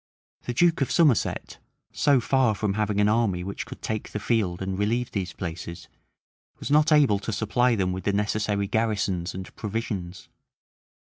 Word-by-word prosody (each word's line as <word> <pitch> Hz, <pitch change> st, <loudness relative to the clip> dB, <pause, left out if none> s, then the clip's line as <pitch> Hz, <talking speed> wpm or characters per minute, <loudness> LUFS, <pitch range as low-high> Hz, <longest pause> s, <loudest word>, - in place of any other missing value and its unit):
The 120 Hz, -, -3 dB
duke 170 Hz, +2 st, +3 dB
of 135 Hz, -, +1 dB
Somerset, 150 Hz, -, +1 dB, 0.3 s
so 140 Hz, -3 st, +3 dB
far 125 Hz, -2 st, +2 dB
from 105 Hz, -1 st, -1 dB
having 105 Hz, -1 st, 0 dB
an 105 Hz, -, +4 dB
army 105 Hz, -5 st, +1 dB
which 100 Hz, +2 st, -5 dB
could -, -, -10 dB
take 110 Hz, -1 st, -3 dB
the 105 Hz, -, -4 dB
field 100 Hz, -6 st, 0 dB
and 95 Hz, 0 st, -3 dB
relieve 115 Hz, +5 st, -1 dB
these 95 Hz, -3 st, -3 dB
places, 85 Hz, -1 st, -7 dB, 0.7 s
was -, -, -5 dB
not 150 Hz, +1 st, +4 dB
able 140 Hz, -10 st, +5 dB
to 110 Hz, -, -4 dB
supply 115 Hz, +4 st, +1 dB
them 95 Hz, -3 st, 0 dB
with 95 Hz, -, -6 dB
the 100 Hz, -, +2 dB
necessary 105 Hz, 0 st, 0 dB
garrisons 100 Hz, -5 st, -1 dB
and 95 Hz, 0 st, -8 dB
provisions. 100 Hz, -5 st, -4 dB
105 Hz, 170 wpm, -25 LUFS, 95-120 Hz, 0.7 s, able